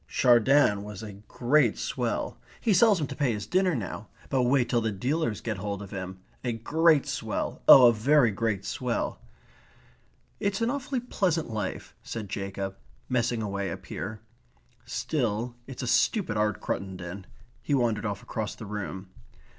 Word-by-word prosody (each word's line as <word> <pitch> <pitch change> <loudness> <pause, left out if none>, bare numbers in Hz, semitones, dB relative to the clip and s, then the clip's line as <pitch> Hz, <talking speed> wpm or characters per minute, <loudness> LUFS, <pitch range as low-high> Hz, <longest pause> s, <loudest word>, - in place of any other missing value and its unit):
"Chardin 120 -3 +4
was 105 0 -8
a 105 -2 -7
great 125 -1 +2
swell.... - - -2 0.2
He 220 - +2
sells 205 0 +5
'em 150 - 0
to - - -7
pay 140 -6 +1
his 105 -1 -4
dinner 185 -2 +2
now. 105 -2 -5 0.2
But 135 - +2
wait 125 -1 +3
till 120 -2 +1
the 110 -1 0
dealers 125 - -1
get 110 -3 -3
hold 100 +1 -3
of 100 - -11
him. 95 -1 -6 0.2
A 120 -2 -1
great 155 +6 +3
swell - - -3
oh, 130 - +11
a 120 - +7
very 125 +2 +4
great 100 -1 -1
swell." 125 -2 -2 1.2
"It's 200 -1 0
an 230 +1 +1
awfully 275 -2 -2
pleasant 180 - -1
life," 105 -3 -4
said 110 -4 -6
Jacob, 95 0 -4 0.3
"messing 120 -2 0
away 100 -1 -2
up - - -7
here. 110 +1 -6 0.6
Still, 120 -4 -2
it's 130 -1 -6
a - - -3
stupid 175 - +2
art, 105 -1 +1
Cruttendon." 95 0 -5 0.4
He 145 - 0
wandered 115 -4 +1
off 100 -1 -4
across 110 -1 -4
the 110 - -9
room. 95 -2 -6
115 Hz, 160 wpm, -28 LUFS, 105-140 Hz, 1.2 s, oh